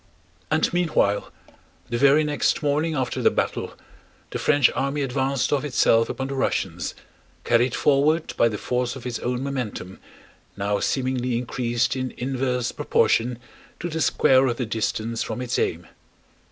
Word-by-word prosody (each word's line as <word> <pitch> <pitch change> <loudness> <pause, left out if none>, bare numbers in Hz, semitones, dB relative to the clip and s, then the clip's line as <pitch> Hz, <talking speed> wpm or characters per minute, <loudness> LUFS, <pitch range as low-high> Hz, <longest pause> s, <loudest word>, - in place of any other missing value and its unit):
And - - +1
meanwhile, 160 - +1 0.6
the 120 - 0
very 140 +3 +5
next 150 0 0
morning 150 +2 +1
after 130 -3 -2
the - - +5
battle, - - -2 0.6
the - - -3
French 145 -4 +4
army 140 +2 -1
advanced 135 0 0
of 145 - +1
itself 115 -5 +3
upon 135 - -3
the 135 - -4
Russians, 90 - -2 0.5
carried 120 0 +2
forward 150 +3 +2
by 115 - +4
the 105 - -4
force 125 +3 -2
of 130 - -10
its 125 -2 -3
own 125 +1 -2
momentum 125 -9 -4 0.6
now 100 +1 0
seemingly 130 -2 0
increased 120 0 -1
in 130 -1 -4
inverse 125 -1 -1
proportion 120 +1 +1 0.4
to 175 - -3
the 160 0 -3
square 130 -2 +4
of 120 -2 -1
the 125 - -1
distance 110 +1 -2
from - - -3
its 125 -1 -1
aim. 85 +1 -1
125 Hz, 155 wpm, -24 LUFS, 120-140 Hz, 0.6 s, very